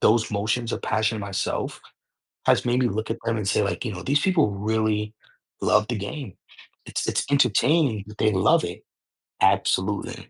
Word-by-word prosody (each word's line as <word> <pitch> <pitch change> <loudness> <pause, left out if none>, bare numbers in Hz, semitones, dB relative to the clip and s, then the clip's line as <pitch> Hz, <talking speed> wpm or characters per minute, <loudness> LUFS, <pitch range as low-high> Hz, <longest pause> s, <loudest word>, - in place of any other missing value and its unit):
those 110 0 +3
motions 110 +3 -1
of - - -3
passion 110 0 0
myself 100 0 -3 0.7
has - - +3
made 120 +1 +2
me 125 - +3
look 110 +1 -3
at - - -2
them 115 -1 0
and 105 - -3
say, 105 - +2
like, 100 - -2
"You 110 - -3
know, 90 - -7
these 145 +2 +2
people 160 - +2
really 105 +1 -1 0.5
love 105 0 +3
the 120 - -2
game." 105 - -6 0.5
It's - - -3
it's - - 0
entertaining 130 -2 +3
that 105 - -12
they 110 - +3
love 95 -1 +3
it. - - -6 0.6
Absolutely. - - +1
110 Hz, 175 wpm, -24 LUFS, 105-120 Hz, 0.7 s, those